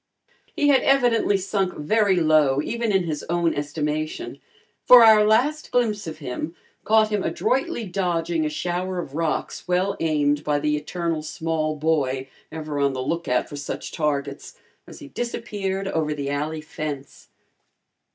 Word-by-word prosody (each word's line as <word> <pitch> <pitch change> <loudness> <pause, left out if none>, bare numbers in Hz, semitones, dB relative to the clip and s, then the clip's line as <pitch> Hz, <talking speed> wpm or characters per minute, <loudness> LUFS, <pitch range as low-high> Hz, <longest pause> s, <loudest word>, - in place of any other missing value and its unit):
He 290 - +2
had 270 -2 +5
evidently 240 -6 +3
sunk 195 -1 -1
very 200 +6 +2
low, 155 -5 +3
even 235 +2 -2
in 190 -2 +2
his 155 -3 -3
own 170 -1 +1
estimation, 150 - -3 0.4
for 250 -2 +9
our 215 -1 +7
last 250 +9 +2
glimpse 220 -6 0
of 160 - -6
him 150 +3 -5 0.3
caught 220 0 +4
him 210 -2 0
adroitly 265 - -1
dodging 175 -3 -1
a 155 - 0
shower 180 +4 -3
of 160 -6 -5
rocks 160 +3 -2
well 185 +2 +1
aimed 150 -2 +1
by 150 -1 +1
the 150 +1 0
eternal 165 +1 -3
small 155 0 -2
boy, 140 -4 0 0.2
ever 155 -2 -4
on 140 -1 +2
the 130 - -4
lookout 150 -3 -1
for 145 - -8
such 145 - -5
targets, 145 -3 -3 0.3
as - - -11
he - - -11
disappeared 200 -5 -3
over 155 -4 -1
the 140 -1 -3
alley 155 +2 -2
fence. 150 -3 -7
165 Hz, 150 wpm, -23 LUFS, 150-205 Hz, 0.4 s, for